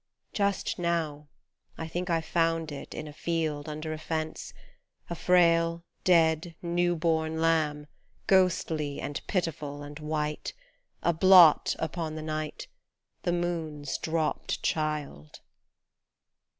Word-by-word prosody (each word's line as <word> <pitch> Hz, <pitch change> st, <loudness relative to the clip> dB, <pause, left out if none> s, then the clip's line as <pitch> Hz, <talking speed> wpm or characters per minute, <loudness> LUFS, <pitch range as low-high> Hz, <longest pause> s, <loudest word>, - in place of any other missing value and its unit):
Just 200 Hz, -2 st, 0 dB
now, 160 Hz, -4 st, -1 dB, 0.5 s
I 160 Hz, -, -4 dB
think 175 Hz, +3 st, -4 dB
I 165 Hz, -1 st, +2 dB
found 165 Hz, -1 st, 0 dB
it 140 Hz, -, -8 dB
in 155 Hz, -, -5 dB
a 150 Hz, -, -9 dB
field, 155 Hz, -2 st, -2 dB
under 155 Hz, +1 st, -4 dB
a 155 Hz, -, -6 dB
fence 160 Hz, 0 st, -4 dB, 0.6 s
A -, -, -1 dB
frail, 170 Hz, -1 st, +3 dB, 0.2 s
dead, 165 Hz, -1 st, +3 dB
new 175 Hz, 0 st, +1 dB
born 160 Hz, -1 st, 0 dB
lamb, 155 Hz, -3 st, +1 dB, 0.4 s
ghostly 165 Hz, -6 st, +2 dB
and 140 Hz, +1 st, -4 dB
pitiful 150 Hz, -6 st, -2 dB
and 145 Hz, +1 st, -9 dB
white, 150 Hz, 0 st, -3 dB, 0.5 s
A 170 Hz, -, +3 dB
blot 180 Hz, -2 st, +7 dB
upon 160 Hz, 0 st, -3 dB
the 155 Hz, -, -5 dB
night, 155 Hz, -1 st, -4 dB, 0.6 s
The 175 Hz, -, 0 dB
moon's 160 Hz, -5 st, -2 dB
dropped 160 Hz, -1 st, -2 dB
child 150 Hz, -, -2 dB
160 Hz, 120 wpm, -28 LUFS, 150-170 Hz, 0.6 s, blot